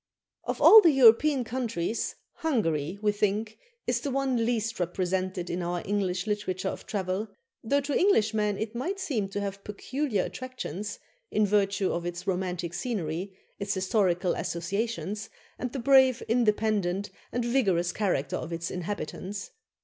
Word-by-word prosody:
" - - -61
Of - - -6
all 440 - +10
the 340 - +6
European 270 +1 +6
countries, 230 -5 -2 0.2
Hungary, 180 - 0
we 210 - +4
think, 210 +1 -1 0.3
is - - 0
the 285 - -2
one 265 -3 +1
least 225 -2 -1
represented 185 +1 -1
in 175 +2 -2
our 175 0 -2
English 190 -3 -1
literature 195 -3 -2
of - - -7
travel, 195 +1 -2 0.4
though 280 +5 +2
to 285 +1 -3
Englishmen 215 - +2
it 220 +1 -4
might 340 +12 -3
seem 235 - -1
to 200 - -3
have 200 0 -5
peculiar 230 +1 -2
attractions, 210 -6 -5 0.3
in 215 - +2
virtue 200 -1 +1
of 170 - -2
its 175 +1 -5
romantic 180 -2 -2
scenery, 185 - -3 0.2
its 200 0 -1
historical 185 -2 +1
associations, 200 +5 -3 0.3
and 250 - -3
the 275 - -4
brave, 265 0 +5
independent, 210 -4 +1 0.2
and 240 0 -1
vigorous 195 -9 +2
character 180 -9 -1
of 165 - -6
its 165 0 -3
inhabitants. 190 +2 -5
205 Hz, 150 wpm, -28 LUFS, 185-235 Hz, 0.4 s, all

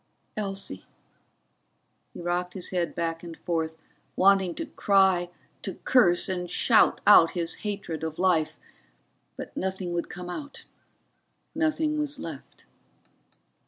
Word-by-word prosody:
Elsie 195 - -3 1.3
He - - -9
rocked 175 +1 -2
his 185 - -4
head 175 -3 -1
back 165 -1 -2
and 170 -2 -9
forth, 160 -2 -2 0.4
wanting 190 -2 +4
to - - -4
cry, 190 -3 +2 0.3
to - - -5
curse 180 -9 +4
and 180 -2 -3
shout 230 +4 +4
out 170 -5 +7
his 170 -1 -1
hatred 200 -7 -5
of 160 -1 -4
life. 175 -4 +1 0.8
But - - -8
nothing 190 -1 -3
would 170 0 -2
come 180 0 -7
out, 285 +11 -7 0.9
nothing 310 -1 0
was 295 -1 -2
left. - - -9
180 Hz, 125 wpm, -27 LUFS, 170-200 Hz, 1.3 s, out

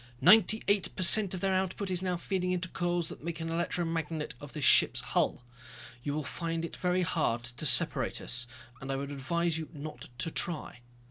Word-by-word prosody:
"Ninety 215 +7 +5
eight 200 -1 +1
per 185 - -1
cent 195 +1 +7
of 180 - -7
their 195 -1 0
output 190 +1 -2
is 180 -1 0
now 180 -1 -2
feeding 180 0 -2
into 180 0 -1
coils 175 -2 -2
that - - -10
make 170 0 -5
an 165 0 -4
electromagnet 165 -2 -2
of 145 -1 -10
this 150 -4 -2
ship's - - +5
hull. - - -1 0.6
You 145 +3 -3
will 155 - -2
find 165 +3 -4
it - - -8
very 180 0 0
hard 150 -9 -1
to 125 +5 -4
separate 130 -1 +3
us. 120 -1 0 0.3
And 135 0 -5
I - - -1
would 140 +1 -5
advise 160 +4 -2
you 160 - -7
not 150 0 -9
to 165 - -2
try." 155 -8 -2
165 Hz, 200 wpm, -30 LUFS, 145-180 Hz, 0.6 s, cent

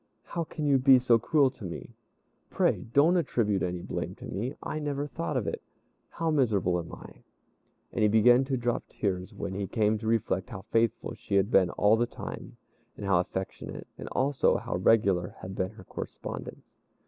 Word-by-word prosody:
"How 170 -1 -4
can 155 -1 -5
you 140 -2 +4
be 130 0 +7
so 120 -2 +4
cruel 140 0 +3
to 130 - -14
me? 85 -3 -7 0.6
Pray - - +1
don't 155 +8 +5
attribute 110 - +1
any 90 -1 -2
blame - - -4
to - - -11
me; 115 +9 -4
I 155 - -3
never 145 -1 -2
thought 85 - -3
of - - -1
it. - - -3 0.5
How 165 -1 -1
miserable 105 - +2
am 85 - -7
I!" - - -12 0.7
And - - -1
he 105 - +5
began 120 +4 +5
to 135 -1 -1
drop 120 0 -1
tears 95 -1 -2
when 100 -2 -5
he 100 0 -3
came 110 +1 +1
to 110 - -5
reflect 115 -1 0
how 100 -4 -8
faithful 115 -1 +1
she - - -4
had 100 +3 +3
been 95 -6 +5
all 105 +5 +3
the 120 +1 +1
time, - - -8 0.4
and 100 - -6
how 95 -3 +3
affectionate, 95 +2 -5
and - - -8
also 135 +1 +2
how - - -3
regular 95 -2 +2
had 95 - -6
been 95 -1 -1
her 110 - -13
correspondence. - - -7
110 Hz, 190 wpm, -28 LUFS, 95-130 Hz, 0.7 s, be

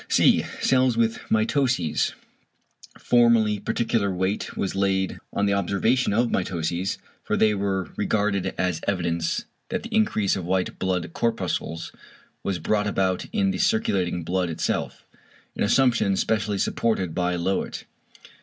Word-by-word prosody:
(c) - - +5 0.2
=Cells 130 -2 +3
with 115 -1 +1
mitoses=. 110 - +1 0.8
Formerly 115 -3 +3
particular 115 -1 0
weight 95 +3 -2
was 95 - -1
laid 95 -1 0
on 100 - 0
the 100 - +2
observation 100 +6 +1
of 115 +3 +1
mitoses, 90 0 -1 0.3
for - - -1
they 110 -1 +4
were 95 -2 -2
regarded 100 -2 0
as 90 -3 -1
evidence 85 -4 -1 0.2
that - - -2
the 230 0 -8
increase 215 - +2
of 95 - -4
white 90 +1 -1
blood 90 -3 -1
corpuscles 95 -7 -2 0.5
was 95 -2 -2
brought 105 +5 0
about 95 -2 0
in 200 -3 +1
the - - -4
circulating 95 - +1
blood 90 +1 -1
itself, 80 - -3 0.5
an - - -5
assumption 115 -3 +3
specially 105 -1 0
supported 95 -4 0
by 90 0 0
Löwit. 95 +3 -2
100 Hz, 135 wpm, -24 LUFS, 90-115 Hz, 0.8 s, c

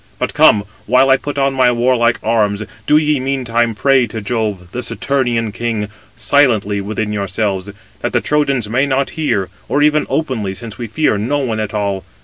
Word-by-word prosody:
But - - -2
come, 105 - +5 0.2
while 130 +3 +4
I 135 - +6
put 145 +1 -6
on 135 0 +2
my 130 -2 +3
warlike 120 -1 +2
arms, 105 -2 +1 0.2
do 150 - +5
ye 150 -2 +2
meantime 120 -4 0
pray 135 +1 +3
to 110 +1 -6
Jove, 105 -5 -3
the 125 - -4
Saturnian 120 -5 -1
king, 110 -2 -3 0.3
silently 110 -8 +2
within 105 +1 -3
yourselves, 100 -1 -2 0.3
that - - -2
the - - +2
Trojans 140 -6 0
may 130 +6 +1
not 135 0 0
hear; 100 - -1 0.2
or 145 - +2
even 150 0 +2
openly, 115 -11 -2
since 115 0 -9
we 120 - -4
fear 110 -2 0
no 125 +8 0
one 120 -6 -2
at 110 0 -3
all. 100 -2 -1
120 Hz, 180 wpm, -16 LUFS, 105-135 Hz, 0.3 s, I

